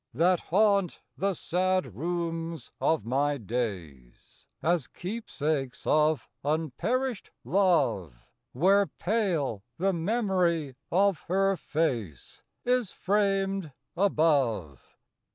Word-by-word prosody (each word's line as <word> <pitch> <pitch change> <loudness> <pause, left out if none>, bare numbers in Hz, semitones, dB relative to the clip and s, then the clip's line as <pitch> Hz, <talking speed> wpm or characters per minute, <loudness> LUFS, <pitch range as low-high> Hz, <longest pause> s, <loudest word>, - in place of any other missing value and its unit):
That 175 +4 +3
haunt 200 -1 +2 0.2
the 195 0 0
sad 185 - 0
rooms 165 +2 -3
of 160 -6 +1
my 140 +4 +1
days, 95 - -6 0.2
As 170 -5 +1
keepsakes 155 - -3
of 155 0 +2 0.2
unperished 180 - -1
love, 155 - +2 0.4
Where 195 +8 +4
pale 175 - -1 0.2
the 195 +3 +1
memory 175 - 0 0.2
of 195 0 +3
her 195 +2 +2
face 120 - -3 0.2
Is 250 -4 +2
framed 195 -5 0 0.2
above. 135 - +1
165 Hz, 90 wpm, -28 LUFS, 135-195 Hz, 0.4 s, Where